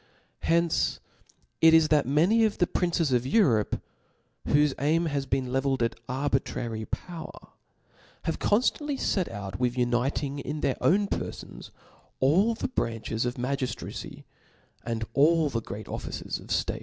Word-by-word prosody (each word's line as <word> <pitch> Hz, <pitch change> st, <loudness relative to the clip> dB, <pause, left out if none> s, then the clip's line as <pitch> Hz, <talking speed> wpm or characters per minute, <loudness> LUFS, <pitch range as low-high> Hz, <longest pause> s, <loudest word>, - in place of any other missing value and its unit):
Hence 170 Hz, 0 st, +1 dB, 0.6 s
it 160 Hz, 0 st, +8 dB
is 160 Hz, -1 st, +5 dB
that 150 Hz, -5 st, +3 dB
many 175 Hz, -, +4 dB
of 215 Hz, -2 st, +1 dB
the 180 Hz, -, +3 dB
princes 170 Hz, -5 st, 0 dB
of 125 Hz, 0 st, +1 dB
Europe, 130 Hz, -, +3 dB, 0.7 s
whofe 145 Hz, -1 st, +3 dB
aim 160 Hz, +4 st, +2 dB
has 140 Hz, -3 st, -2 dB
been 130 Hz, -2 st, -1 dB
levelled 135 Hz, -1 st, +1 dB
at 115 Hz, -, +1 dB, 0.2 s
arbitrary 130 Hz, -4 st, -2 dB
power, 170 Hz, +4 st, -7 dB, 0.7 s
have -, -, -2 dB
conftantly 275 Hz, +6 st, +1 dB
6t 190 Hz, -8 st, 0 dB
out 100 Hz, -2 st, -6 dB
with 125 Hz, 0 st, 0 dB
uniting 125 Hz, +3 st, 0 dB
in 145 Hz, +2 st, -4 dB
their 135 Hz, -, 0 dB
own 200 Hz, +3 st, +3 dB
perfons -, -, -6 dB, 0.5 s
all 190 Hz, +12 st, +3 dB
the 225 Hz, -, -3 dB
branches 115 Hz, -, -2 dB
of 120 Hz, -, -3 dB
magiitracy, 130 Hz, +1 st, -4 dB, 0.6 s
and 115 Hz, -1 st, -3 dB
all 155 Hz, +2 st, +4 dB
the 115 Hz, -, -1 dB
great 105 Hz, 0 st, -7 dB
offices -, -, -5 dB
of -, -, -13 dB
ftate. -, -, -1 dB
140 Hz, 145 wpm, -27 LUFS, 125-165 Hz, 0.7 s, it